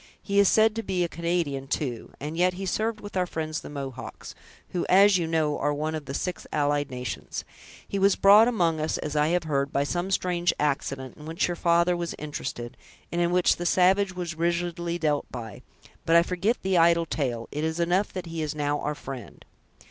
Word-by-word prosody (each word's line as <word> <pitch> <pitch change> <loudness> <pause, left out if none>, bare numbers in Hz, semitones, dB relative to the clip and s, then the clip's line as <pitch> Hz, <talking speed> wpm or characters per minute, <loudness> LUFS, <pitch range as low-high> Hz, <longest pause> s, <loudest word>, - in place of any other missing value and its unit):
He 200 0 0
is 200 - +6
said 220 0 +4
to - - 0
be 190 -4 -1
a - - 0
Canadian 170 -5 -2
too; 130 -4 -3
and 150 +3 -5
yet 180 +2 +3
he 195 +1 -5
served 215 +4 -1
with 205 -1 -9
our 180 -1 +1
friends 155 -2 -3
the - - -10
Mohawks, 135 -3 -7 0.4
who, 175 - -2
as 195 0 +6
you 165 - -1
know, 160 -2 0
are 145 - +1
one 155 +2 -2
of 155 -2 -5
the 135 0 -5
six 180 -2 -4
allied 145 -1 +1
nations. 125 -1 -5 0.4
He 200 - -2
was 195 0 +4
brought 205 +3 +7
among 170 -9 +1
us, 155 +1 -1
as 150 0 -4
I 150 0 +3
have 175 +1 +1
heard, 140 -3 -1
by 140 - +1
some 175 +6 -2
strange 180 -2 +1
accident 135 -2 -2
in 150 - -11
which 165 +3 0
your 175 - -2
father 170 +1 +3
was 170 -1 -3
interested, 135 -5 -6 0.3
and 175 - 0
in 170 - +2
which 180 0 +3
the 175 - -4
savage 190 +1 +3
was 175 -2 -4
rigidly 170 +1 -1
dealt 150 -3 -1
by; 115 -5 -7 0.4
but 165 - +3
I 170 - +7
forget 185 +7 0
the 190 -2 +2
idle 170 0 +4
tale, 125 -7 -2
it 150 - -3
is 160 +1 -1
enough, 180 +4 +1
that 185 -2 -5
he 165 -1 -5
is 155 -1 -3
now 145 0 0
our 150 0 -2
friend." 135 -3 -9
170 Hz, 215 wpm, -26 LUFS, 145-180 Hz, 0.4 s, brought